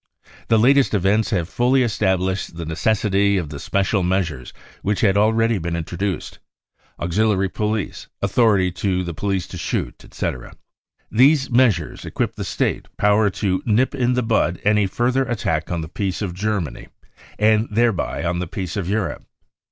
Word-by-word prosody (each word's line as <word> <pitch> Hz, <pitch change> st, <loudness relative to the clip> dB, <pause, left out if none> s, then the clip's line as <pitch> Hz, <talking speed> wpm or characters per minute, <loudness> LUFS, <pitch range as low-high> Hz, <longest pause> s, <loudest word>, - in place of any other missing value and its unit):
The 115 Hz, -, +4 dB
latest 130 Hz, +1 st, +4 dB
events 105 Hz, +3 st, +2 dB
have 90 Hz, -6 st, 0 dB
fully 125 Hz, +6 st, +2 dB
estab 105 Hz, -5 st, +1 dB
lished 95 Hz, -1 st, -3 dB
the 85 Hz, 0 st, -5 dB
necessity 100 Hz, +3 st, +1 dB
of 85 Hz, -5 st, -3 dB
the 70 Hz, -1 st, -7 dB
special 100 Hz, +4 st, 0 dB
measures 85 Hz, -8 st, -1 dB, 0.3 s
which 105 Hz, 0 st, -1 dB
had 100 Hz, -3 st, +3 dB
already 110 Hz, +1 st, +2 dB
been 85 Hz, 0 st, -3 dB
introduced 85 Hz, +3 st, -4 dB, 0.6 s
(auxiliary 95 Hz, +2 st, +1 dB
police, 105 Hz, +1 st, -3 dB
authority 100 Hz, -6 st, +2 dB
to 90 Hz, 0 st, -1 dB
the 85 Hz, -1 st, -5 dB
police 95 Hz, +1 st, -2 dB
to -, -, -7 dB
shoot, -, -, -3 dB
etc.). 60 Hz, -, -5 dB, 0.6 s
These 135 Hz, +3 st, +4 dB
measures 115 Hz, -10 st, +2 dB
equip -, -, -2 dB
the -, -, -5 dB
State -, -, -2 dB
power 105 Hz, 0 st, +3 dB
to 95 Hz, -1 st, -1 dB
nip 120 Hz, +5 st, +2 dB
in 125 Hz, -2 st, +1 dB
the 125 Hz, 0 st, 0 dB
bud 110 Hz, -6 st, +1 dB
any 105 Hz, -1 st, +3 dB
further 125 Hz, +6 st, +1 dB
attack 85 Hz, -10 st, -2 dB
on 85 Hz, -2 st, -1 dB
the 80 Hz, -, -6 dB
peace 95 Hz, +4 st, -3 dB
of 90 Hz, -4 st, -3 dB
Germany 95 Hz, -, -3 dB, 0.5 s
and 110 Hz, +1 st, +3 dB
thereby 115 Hz, -5 st, 0 dB
on 85 Hz, 0 st, -1 dB
the 90 Hz, -, -3 dB
peace 90 Hz, -1 st, -5 dB
of 95 Hz, -3 st, -3 dB
Europe. 105 Hz, 0 st, -2 dB
100 Hz, 160 wpm, -21 LUFS, 90-110 Hz, 0.6 s, The